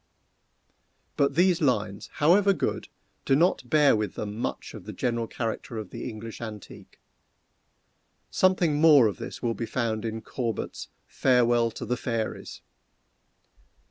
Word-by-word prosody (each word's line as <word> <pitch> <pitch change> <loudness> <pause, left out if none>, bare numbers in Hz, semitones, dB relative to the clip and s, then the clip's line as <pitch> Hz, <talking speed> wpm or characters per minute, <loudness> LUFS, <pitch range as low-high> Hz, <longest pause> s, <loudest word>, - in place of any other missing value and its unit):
But 140 -1 +1
these 180 +1 +3
lines, 105 -8 0
however 195 +6 +4
good, - - -2 0.4
do 135 - +3
not 155 -5 +1
bear 150 -4 +5
with 105 -3 -2
them 105 -1 -5
much 115 - -4
of - - -10
the - - -7
general 120 -2 -1
character 115 0 -4
of 105 -4 -6
the - - -5
English 115 0 -8
antique. 110 -3 -10 1.3
Something 175 -5 +2
more 150 -6 +7
of 105 -5 0
this - - -8
will 115 -1 +1
be 115 0 -5
found 110 -2 -2
in 110 -1 -4
Corbet's 115 -2 -4 0.2
"Farewell 120 -2 +2
to - - -5
the 125 - -1
Fairies!" 115 -2 -4
120 Hz, 140 wpm, -26 LUFS, 110-145 Hz, 1.3 s, more